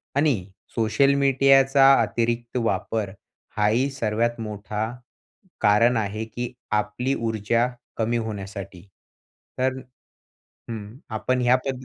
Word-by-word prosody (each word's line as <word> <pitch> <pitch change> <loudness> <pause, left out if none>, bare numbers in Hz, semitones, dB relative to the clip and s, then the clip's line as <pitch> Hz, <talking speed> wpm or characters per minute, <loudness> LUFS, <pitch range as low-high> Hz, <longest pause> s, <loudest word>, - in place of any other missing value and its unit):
आणि 145 -3 +3 0.4
सोशल 135 +5 +3
मीडियाचा 135 0 +5
अतिरिक्त 120 +1 -1
वापर 110 -3 -1 0.5
हा 105 0 +3
ही 125 +6 +2
सर्वात 120 -2 -1
मोठा 105 0 -4 0.8
कारण 115 +4 +4
आहे, 110 +1 -2
की 120 +2 -5 0.2
आपली 105 +5 0
ऊर्जा 115 +1 0 0.3
कमी 115 +1 0
होण्यासाठी. 100 -4 -6 0.7
तर 130 0 0 0.9
हं, 110 +2 -7 0.2
आपण 125 +3 0
ह्या 125 +1 +5
पद्ध 130 -1 -3
115 Hz, 105 wpm, -24 LUFS, 105-130 Hz, 0.9 s, मीडियाचा